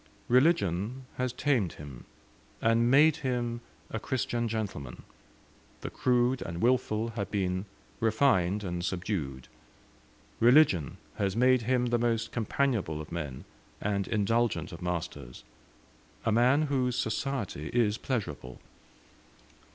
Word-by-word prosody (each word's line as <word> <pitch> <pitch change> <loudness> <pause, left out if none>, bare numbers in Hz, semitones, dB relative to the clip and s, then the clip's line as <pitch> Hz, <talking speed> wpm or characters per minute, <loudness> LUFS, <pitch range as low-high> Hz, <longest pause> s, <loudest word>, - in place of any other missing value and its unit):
Religion 125 - +2
has 125 -1 0
tamed 125 - 0
him, 70 -4 -10 0.5
and 115 +1 +3
made 150 +4 +6
him 120 -4 -2 0.3
a 110 - -2
Christian 120 -1 -1
gentleman: 100 - -5 0.8
the - - -5
crude 125 0 +1
and 85 0 -5
wilful 115 -1 +1
have 115 -3 -4
been 95 -1 -1 0.3
refined 105 -4 +2
and 90 -2 -3
subdued; 85 -9 -3 0.9
religion 120 - +4 0.2
has 100 -1 0
made 125 +1 +4
him 125 +2 +1
the 120 0 +1
most 115 -1 0
companionable 115 - 0
of 75 +1 -8
men 75 -6 -5 0.3
and 100 -1 -1
indulgent 110 -4 0
of 85 0 -9
masters 85 -8 -5 0.8
a 110 - +2
man 125 +7 +4
whose 130 -4 0
society 110 - -2
is 115 -3 +1
pleasurable. 75 - -4
115 Hz, 115 wpm, -29 LUFS, 90-125 Hz, 0.9 s, made